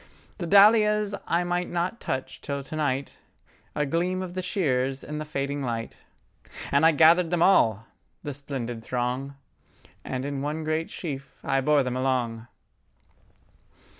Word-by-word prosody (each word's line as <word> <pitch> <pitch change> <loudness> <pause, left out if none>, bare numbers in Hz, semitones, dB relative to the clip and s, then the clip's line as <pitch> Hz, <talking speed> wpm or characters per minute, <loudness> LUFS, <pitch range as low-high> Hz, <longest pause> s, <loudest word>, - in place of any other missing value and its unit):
The 175 - -3
dahlias 210 +1 +5
I 170 +1 +1
might 175 0 -1
not 175 +6 -2
touch 130 0 -4
till 140 -1 -4
to 145 - -8
night!A 145 0 -4
gleam 180 +5 -1
of 180 -1 -7
the 185 - -3
shears 135 -8 -1
in 150 0 -5
the 155 - -4
fading 140 -1 -3
light, 115 -3 -4 0.7
And 140 +3 +5
I - - +6
gathered 165 +3 +5
them 175 -1 +2
all,—the 115 - +1
splendid 125 -4 -5
throng, 125 +3 -2 0.7
And 130 0 -4
in 140 -1 -3
one 150 +3 -3
great 155 +1 -1
sheaf 140 -5 -7
I 135 - +1
bore 145 0 +3
them 125 -1 -3
along.. 125 -3 -1
145 Hz, 140 wpm, -26 LUFS, 130-170 Hz, 0.7 s, I